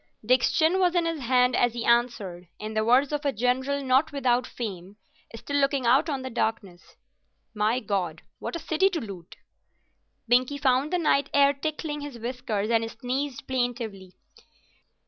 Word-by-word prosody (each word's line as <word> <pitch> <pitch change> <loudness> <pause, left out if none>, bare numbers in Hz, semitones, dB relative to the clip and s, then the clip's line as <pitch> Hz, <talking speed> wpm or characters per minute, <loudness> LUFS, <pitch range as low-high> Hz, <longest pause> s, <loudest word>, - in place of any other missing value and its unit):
Dick's 255 +2 +3
chin 330 +4 +2
was 360 -1 +2
in 345 -1 +2
his 330 -2 -2
hand 250 0 +3
as 245 -1 +2
he 235 -1 -4
answered, 235 -7 0
in 215 +1 -6
the 215 0 +1
words 255 +5 +3
of 295 0 -2
a 280 - +1
general 260 +4 0
not 265 +4 +2
without 250 -3 +1
fame, 195 -4 -7 0.4
still 285 +5 -3
looking 275 -2 +1
out 265 +7 +4
on 275 -3 -3
the 260 - -5
darkness—"'My 220 +1 -4
God, 185 -7 -2 0.2
what - - -5
a - - -3
city 325 +4 +2
to 355 -4 -2
loot!'" 195 - -9 0.9
Binkie 255 +4 +2
found 265 +2 +2
the 360 - +2
night 280 -4 +2
air 280 0 +5
tickling 295 +1 -4
his 285 -4 -7
whiskers 230 -3 -3
and 225 0 +1
sneezed 260 +2 -4
plaintively. 235 -7 -3
250 Hz, 165 wpm, -26 LUFS, 225-285 Hz, 0.9 s, air